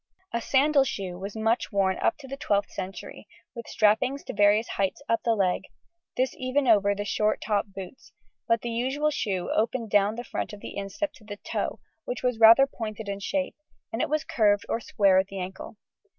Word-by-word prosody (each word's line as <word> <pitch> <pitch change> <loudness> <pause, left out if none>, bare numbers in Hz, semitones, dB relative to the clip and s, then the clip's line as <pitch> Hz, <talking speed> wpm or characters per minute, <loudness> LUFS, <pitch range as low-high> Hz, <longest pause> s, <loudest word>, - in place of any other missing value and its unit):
A 235 - 0
sandal 280 +3 +4
shoe 190 -8 -4
was 195 +2 -6
much 225 +2 0
worn 195 -2 +1
up - - +1
to 275 - -12
the 275 - -5
12th 205 -6 0
century, 190 +1 -7 0.3
with 235 -3 -8
strappings 235 +6 +2
to - - -6
various 205 +2 +4
heights 195 -1 -1
up 230 - +1
the 230 -1 +2
leg, 190 -3 0 0.5
this 255 +1 +1
even 260 +1 0
over 200 -3 +4
the 205 +1 -4
short 215 +1 +1
top 205 -2 0
boots, 195 +3 -10 0.4
but 230 -1 +2
the 240 - -3
usual 265 +6 0
shoe 190 -10 -2
opened 225 0 -1
down 205 +1 +3
the 240 - -5
front 235 - -4
of 205 - -8
the - - -8
instep 200 +10 -3
to 225 - -18
the 205 -1 -8
toe, - - -3 0.3
which - - -5
was 250 -3 0
rather 230 +4 +8
pointed 220 -5 -6
in 200 0 -3
shape, 280 +7 -2 0.4
and 225 - -1
it - - 0
was 305 +1 0
curved 205 -7 +2
or - - -1
square 195 -4 +3
at 190 - 0
the 195 - -8
ankle. 190 +3 -7
220 Hz, 205 wpm, -26 LUFS, 200-255 Hz, 0.5 s, rather